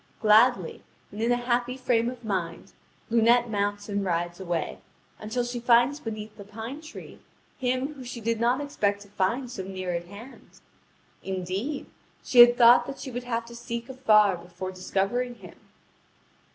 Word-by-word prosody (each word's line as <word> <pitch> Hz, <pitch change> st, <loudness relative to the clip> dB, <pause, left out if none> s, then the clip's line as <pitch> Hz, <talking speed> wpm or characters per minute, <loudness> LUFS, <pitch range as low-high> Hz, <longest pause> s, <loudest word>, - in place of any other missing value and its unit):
Gladly 215 Hz, -3 st, +4 dB, 0.3 s
and 210 Hz, -, -7 dB
in 235 Hz, +2 st, +1 dB
a -, -, +4 dB
happy 245 Hz, +1 st, -1 dB
frame 240 Hz, -2 st, +1 dB
of 245 Hz, -1 st, -9 dB
mind 180 Hz, -5 st, -4 dB, 0.4 s
Lunete 235 Hz, +1 st, +4 dB
mounts 205 Hz, 0 st, -2 dB
and 200 Hz, -1 st, -2 dB
rides 175 Hz, -1 st, -2 dB
away, 170 Hz, -4 st, -3 dB, 0.4 s
until 220 Hz, +3 st, -2 dB
she 245 Hz, 0 st, -4 dB
finds 240 Hz, +4 st, +3 dB
beneath 215 Hz, -4 st, -7 dB
the 200 Hz, -, -9 dB
pine 225 Hz, +8 st, -8 dB
tree 315 Hz, -, -11 dB, 0.4 s
him 255 Hz, +2 st, -1 dB
whom 270 Hz, -3 st, -10 dB
she 245 Hz, -1 st, -7 dB
did 230 Hz, 0 st, -1 dB
not 245 Hz, +4 st, +2 dB
expect 205 Hz, -8 st, -1 dB
to 205 Hz, -, -19 dB
find 235 Hz, +6 st, -1 dB
so 195 Hz, -, -5 dB
near 185 Hz, -1 st, -4 dB
at 170 Hz, 0 st, -3 dB
hand. 215 Hz, +8 st, -13 dB, 0.6 s
Indeed, 190 Hz, +9 st, -4 dB, 0.4 s
she 245 Hz, -, +2 dB
had 240 Hz, 0 st, +9 dB
thought 240 Hz, 0 st, +7 dB
that 275 Hz, -, -6 dB
she 260 Hz, -, -7 dB
would 245 Hz, 0 st, -5 dB
have 230 Hz, -1 st, -2 dB
to 235 Hz, 0 st, -11 dB
seek 235 Hz, 0 st, -6 dB
afar 215 Hz, -7 st, +4 dB
before 180 Hz, +2 st, -7 dB
discovering 195 Hz, +7 st, -2 dB
him. -, -, -14 dB
230 Hz, 165 wpm, -26 LUFS, 200-245 Hz, 0.6 s, had